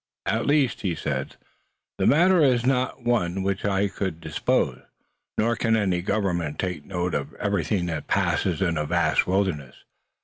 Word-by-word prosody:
"At 115 +1 0
least," 145 -4 +2
he 90 -5 -1
said, - - -3 0.6
"the - - +2
matter 175 +4 +5
is 125 -4 +3
not 130 -1 0
one 95 -7 +1
of 95 - -1
which 95 0 -1
I 100 0 +1
could 95 -4 -4
dispose. 80 -2 0 0.6
Nor 115 +2 +2
can 115 -1 +1
any 95 -5 +1
government 90 -6 -1
take 90 -6 -3
note 90 -2 -2
of - - -3
everything 95 -2 -1
that 80 -4 -4
passes 90 -1 +1
in 85 -4 0
a 75 - -1
vast - - +2
wilderness. 90 -9 -1
95 Hz, 165 wpm, -25 LUFS, 85-115 Hz, 0.6 s, matter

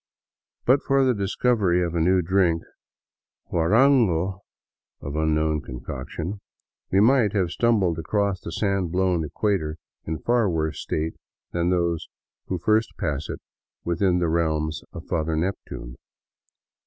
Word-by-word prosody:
But 135 +3 +4
for 135 -1 +2
the 130 - +3
dis 100 -2 -3
covery 95 -8 +3
of 85 - -4
a 85 - 0
new 90 +2 +3
drink, 85 -2 +2 0.4
— - - -43
guarango, 95 -1 +3 0.6
of 70 +1 -6
unknown 80 0 +1
concoction 70 - -6 0.2
— - - -53
we 95 - +4
might 115 -1 +4
have 95 -5 +1
stumbled 100 -9 +2
across 100 +2 0
the - - -6
sand 100 -1 0
blown 90 -2 +1
equator 80 0 -1 0.3
in 80 0 -2
far 120 +2 +2
worse 80 -3 -1
state 80 +1 -2 0.4
than 85 0 0
those 85 -2 0 0.4
who 95 - -1
first 110 +6 +1
pass 75 +1 -2
it - - -5 0.4
within 90 +1 +2
the 85 -1 +1
realms 80 -1 0
of 85 - -9
Father 80 -2 -1
Neptune. 80 -8 -4
90 Hz, 140 wpm, -24 LUFS, 80-100 Hz, 0.6 s, But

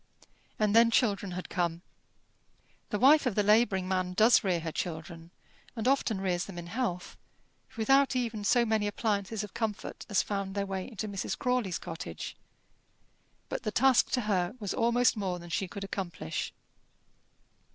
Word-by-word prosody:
And 210 0 +1
then 230 0 +7
children 205 -5 +1
had 180 +1 -5
come. 170 -1 -2 1.1
The 210 - -1
wife 280 +4 +6
of 225 - -1
the 210 - +3
labouring 205 -3 +3
man 185 -1 -1
does 220 +6 +5
rear 180 -4 +1
her 160 0 -4
children, 165 0 -5 0.5
and 225 0 -2
often 255 -6 +2
rears 180 -2 -1
them 195 -3 -9
in 175 - -6
health, 180 -2 -3 0.6
without 270 +4 +3
even 230 -4 -2
so 235 +3 +3
many 220 -2 +1
appliances 205 0 -1
of 205 - -9
comfort 225 -3 -4
as 205 - +2
found 195 -1 -3
their 200 -1 0
way 190 -1 -4
into 215 -4 -5
Mrs. 200 -2 -3
Crawley's 250 -8 0
cottage; 165 - -7 1.1
but - - -4
the 230 - -2
task 255 +3 +4
to 250 - +2
her 200 -1 0
was 205 -3 -3
almost 235 +1 +3
more 190 -3 -2
than 175 0 -10
she 200 -2 -1
could 200 +2 -7
accomplish. 185 - -4
205 Hz, 160 wpm, -30 LUFS, 185-230 Hz, 1.1 s, then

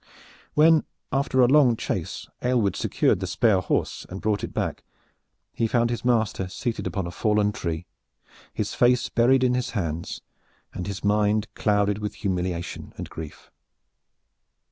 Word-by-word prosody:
When 160 +1 +6 0.3
after 135 -1 +2
a 125 - +6
long 130 -3 +5
chase - - -4
Aylward 120 -6 +1
secured - - +1
the - - -3
spare 105 -5 +3
horse - - -1
and 95 - -6
brought 105 -1 0
it - - -4
back, - - -3 0.7
he 115 - 0
found 120 +1 +2
his 120 - -3
master 110 -6 +1
seated 115 +5 -3
upon 95 -4 -2
a 85 - -5
fallen 105 +2 +1
tree, 85 -3 -4 0.7
his - - -3
face 120 0 +3
buried 130 +2 +4
in 125 -1 +3
his 125 +1 -1
hands 85 -3 -3 0.5
and 90 - -5
his 100 -2 -5
mind 105 +1 +1
clouded 105 -1 +1
with 105 -1 -4
humiliation 90 -3 -3
and - - -7
grief. 80 -2 -9
105 Hz, 150 wpm, -25 LUFS, 95-120 Hz, 0.7 s, When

